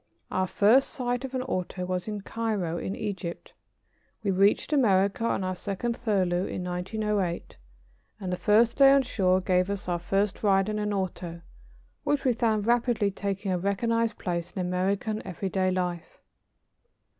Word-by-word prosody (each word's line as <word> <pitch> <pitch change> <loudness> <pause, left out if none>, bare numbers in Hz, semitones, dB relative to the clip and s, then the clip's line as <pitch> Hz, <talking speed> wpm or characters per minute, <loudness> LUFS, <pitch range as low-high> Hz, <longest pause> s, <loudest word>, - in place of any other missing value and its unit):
Our 185 0 0
first 225 +9 +4
sight 245 -3 -2
of 265 0 -6
an 255 - -1
auto 185 -6 -3
was 180 +1 -3
in 210 -1 -4
Cairo, 200 -7 -2
in 190 - -4
Egypt. 190 -4 -5 0.7
We 200 - +1
reached 200 +9 +3
America 200 -6 +3
on 195 - 0
our 185 0 -1
second 200 +6 -3
furlough 190 -6 0
in 180 - -4
1908, 185 0 -2 0.6
and 185 -3 -3
the - - +1
first 215 +5 +3
day 275 -1 +8
on 275 -1 +5
shore 190 -6 +2
gave 185 0 +1
us 200 -2 -4
our 175 -1 0
first 195 +3 0
ride 195 -1 +3
in 210 0 -2
an 210 0 -1
auto, 180 -3 -3 0.6
which 290 -2 0
we 255 - +4
found 220 -3 +1
rapidly 235 -3 +2
taking 195 0 -3
a 180 - 0
recognized 230 +4 0
place 170 -1 -3
in - - -7
American 190 +4 -1
everyday 190 0 -1
life. 180 -2 -3
200 Hz, 160 wpm, -27 LUFS, 185-220 Hz, 0.7 s, day